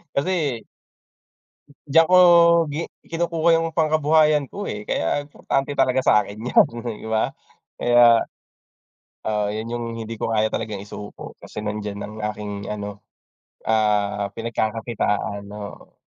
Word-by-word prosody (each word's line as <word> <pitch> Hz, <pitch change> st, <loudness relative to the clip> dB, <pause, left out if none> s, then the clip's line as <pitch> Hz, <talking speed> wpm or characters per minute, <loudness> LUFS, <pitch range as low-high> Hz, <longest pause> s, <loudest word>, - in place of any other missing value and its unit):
Kasi 145 Hz, -6 st, 0 dB, 1.3 s
Diyan 165 Hz, +3 st, +5 dB
ko -, -, +7 dB, 0.6 s
gi 155 Hz, +3 st, -3 dB, 0.3 s
kinukuha 170 Hz, 0 st, 0 dB
'yung 165 Hz, 0 st, 0 dB
pangkabuhayan 155 Hz, -2 st, +3 dB
ko, 205 Hz, +1 st, -5 dB
eh, 105 Hz, 0 st, -5 dB
kaya 125 Hz, +13 st, -1 dB
importante 145 Hz, -1 st, -2 dB
talaga 130 Hz, +1 st, +3 dB
sa'kin 105 Hz, 0 st, +2 dB
'yan, -, -, +5 dB, 0.3 s
di 110 Hz, -, -9 dB
ba? 110 Hz, 0 st, 0 dB, 0.5 s
Kaya, 120 Hz, -1 st, +6 dB, 1.1 s
ah, 105 Hz, -1 st, 0 dB
'yun 110 Hz, +2 st, -4 dB
'yung 120 Hz, 0 st, -3 dB
hindi 115 Hz, 0 st, -6 dB
ko -, -, -1 dB
kaya 110 Hz, -1 st, +1 dB
talagang 105 Hz, -3 st, -3 dB
isuko, 105 Hz, 0 st, -9 dB
kasi 105 Hz, -, -8 dB
nandiyan 105 Hz, -1 st, -4 dB
ang 105 Hz, -, -8 dB
aking 105 Hz, -1 st, -5 dB
ano, 105 Hz, -1 st, -5 dB, 0.7 s
ah, 105 Hz, -2 st, +1 dB
pinagkakakitaan, 110 Hz, -3 st, -2 dB
oo. 105 Hz, -1 st, -9 dB
110 Hz, 125 wpm, -22 LUFS, 105-145 Hz, 1.3 s, ko